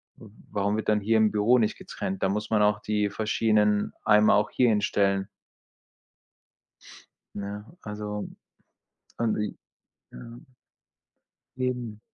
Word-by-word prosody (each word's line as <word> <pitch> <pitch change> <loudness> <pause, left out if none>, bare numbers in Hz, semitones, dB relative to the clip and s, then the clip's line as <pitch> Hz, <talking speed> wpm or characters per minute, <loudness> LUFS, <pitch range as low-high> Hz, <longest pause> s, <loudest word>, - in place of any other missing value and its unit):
W 110 - -14 0.2
warum 100 +1 0
wird 110 - -4
dann 105 -1 +2
hier 110 +2 +2
im 110 -1 +4
Büro 105 +4 +3
nicht 110 -3 0
getrennt? 95 0 -5
Da 95 - +2
muss 105 +2 -2
man 110 -2 +2
auch 105 0 +3
die 105 -1 0
verschiedenen 105 -1 +1
Eimer 105 0 +5
auch 105 - +2
hier 125 -2 +3
hinstellen. 100 -2 +1 2.1
Ja, 100 +1 -5 0.2
also 105 -1 -5 0.9
und 115 -2 +1
die 105 - -3 0.6
ja. - - -10 1.4
Eben. 125 -4 -3
105 Hz, 125 wpm, -26 LUFS, 105-110 Hz, 2.1 s, Eimer